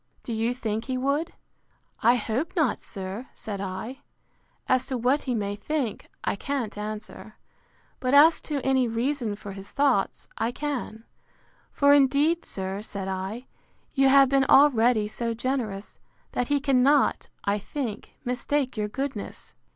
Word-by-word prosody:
—Do 235 - -4
you 225 +2 0
think 220 -2 -3
he 260 -1 -2
would? 280 +5 0 0.7
I 235 +2 +5
hope 245 - -2
not, 310 - +1
sir, 195 +5 -6
said 200 -3 -5
I: 195 +8 -5 0.7
As 255 -1 +2
to 260 - -2
what 255 +5 +2
he 250 -3 0
may 205 -2 -2
think, 245 0 -3
I - - 0
can't 260 0 -3
answer; 215 +1 -7 0.6
but 255 +1 +1
as 315 +3 +7
to 285 -3 -2
any 265 -2 +3
reason 235 -1 -1
for 205 -1 -8
his 195 0 -8
thoughts, 275 -8 +1
I 225 +2 +1
can: 255 -7 -4 0.7
For 285 0 +5
indeed, 290 +4 +3
sir, 190 +1 -4
said 200 -3 -6
I, 190 +6 -4 0.5
you 270 -1 +4
have 275 0 +7
been 270 +1 +3
already 245 -7 +5
so 230 +2 -3
generous, 225 -5 -3 0.3
that 245 - -1
he 290 0 +2
cannot, 275 +1 +3 0.2
I 200 +1 +1
think, 225 -1 -5
mistake 260 +2 -1
your 210 -1 -1
goodness. 265 -1 -5
245 Hz, 150 wpm, -26 LUFS, 210-275 Hz, 0.7 s, as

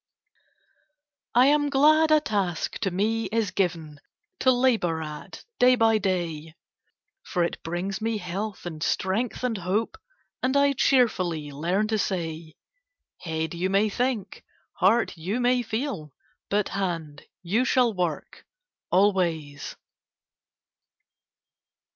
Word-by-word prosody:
I 245 +2 +7
am 290 +1 +3
glad 310 +3 +5
a 310 0 +6
task 200 - -2
to 200 - 0
me 220 +5 0
is 225 -3 -1
given 165 -6 -2 0.4
To 260 - +3
labor 235 -10 +2
at 150 -1 -9
day 250 0 +6
by 225 -2 +3
day; 165 -5 -2 0.7
For 175 -3 -1
it 170 - -3
brings 185 +5 -4
me 225 0 -1
health, 195 +2 -5
and 160 -3 -6
strength, 205 +9 -1
and 235 -5 -1
hope, 190 +5 -2 0.4
And 260 +2 +1
I 280 0 +4
cheerfully 185 - +1
learn 175 +9 0
to 220 -1 0
say 165 -5 -3 0.6
'Head, 160 -1 -3
you 180 +2 -1
may 200 +3 +2
think; 230 -3 -2 0.3
heart, 220 +4 +2
you 195 +9 -2
may 250 0 +2
feel; 220 - -4 0.4
But 205 0 +1
hand, 165 -6 -3 0.2
you 205 +8 +1
shall 250 -3 +2
work 175 -5 -3 0.5
always!' 170 -7 +1
195 Hz, 120 wpm, -26 LUFS, 170-235 Hz, 0.7 s, I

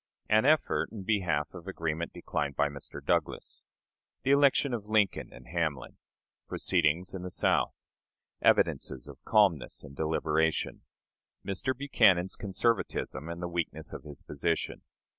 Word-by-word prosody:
An 110 +3 +4
Effort 155 +1 +3
in 105 -4 -7
Behalf 90 -8 0
of 90 0 -10
Agreement 85 -3 -2
declined 70 -1 -3
by 75 - +2
Mr. 70 -1 -9
Douglas. - - -1 0.6
The 135 - +2
Election 140 -1 +4
of 105 -3 -4
Lincoln 105 -3 +2
and - - -13
Hamlin. 80 -6 -2 0.5
Proceedings 85 +4 +1
in 95 - -5
the 90 - -5
South. - - +1 0.7
Evidences 65 - +2
of - - -12
Calmness 95 -10 +2
and 70 - -11
Deliberation. 80 +1 0 0.6
Mr. 110 +6 -2
Buchanan's 95 -10 +3
Conservatism 95 - -1
and 85 +1 -5
the - - -1
weakness 85 -1 -3
of - - -6
his 75 -2 -11
Position. 75 +3 -2
85 Hz, 135 wpm, -30 LUFS, 80-105 Hz, 0.7 s, An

